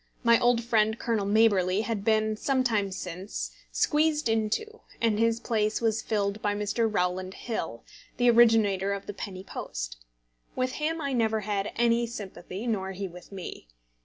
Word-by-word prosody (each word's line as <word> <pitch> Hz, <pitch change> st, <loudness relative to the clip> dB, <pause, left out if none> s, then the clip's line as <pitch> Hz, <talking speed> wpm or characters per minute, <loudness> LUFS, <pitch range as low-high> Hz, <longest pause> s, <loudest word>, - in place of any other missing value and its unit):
My 235 Hz, -1 st, +6 dB
old 240 Hz, -1 st, +3 dB
friend 220 Hz, -1 st, +2 dB
Colonel 220 Hz, -5 st, -1 dB
Maberly 200 Hz, -3 st, +3 dB
had 220 Hz, -2 st, -2 dB
been, 215 Hz, 0 st, +2 dB
some 260 Hz, +4 st, +1 dB
time 210 Hz, -5 st, +1 dB
since, 185 Hz, +1 st, -5 dB, 0.2 s
squeezed 300 Hz, -1 st, +2 dB
into, 225 Hz, -, -1 dB, 0.2 s
and 220 Hz, -2 st, +2 dB
his 230 Hz, 0 st, +2 dB
place 215 Hz, -3 st, 0 dB
was 225 Hz, -1 st, +1 dB
filled 205 Hz, -1 st, -1 dB
by 205 Hz, 0 st, 0 dB
Mr. 210 Hz, +2 st, 0 dB
Rowland 185 Hz, -1 st, -1 dB
Hill, 165 Hz, -, -4 dB, 0.3 s
the 245 Hz, -, +3 dB
originator 215 Hz, -4 st, +4 dB
of 200 Hz, 0 st, -5 dB
the 205 Hz, -, -5 dB
penny 190 Hz, -1 st, -7 dB
post. -, -, -5 dB, 0.6 s
With 255 Hz, 0 st, 0 dB
him 325 Hz, +2 st, 0 dB
I 280 Hz, -2 st, -2 dB
never 220 Hz, -3 st, +1 dB
had 205 Hz, -1 st, -2 dB
any 235 Hz, 0 st, +2 dB
sympathy, 200 Hz, -2 st, -7 dB
nor 190 Hz, -5 st, -1 dB
he 195 Hz, +1 st, -4 dB
with 180 Hz, +2 st, -13 dB
me. 185 Hz, -, -8 dB
215 Hz, 160 wpm, -28 LUFS, 195-235 Hz, 0.6 s, My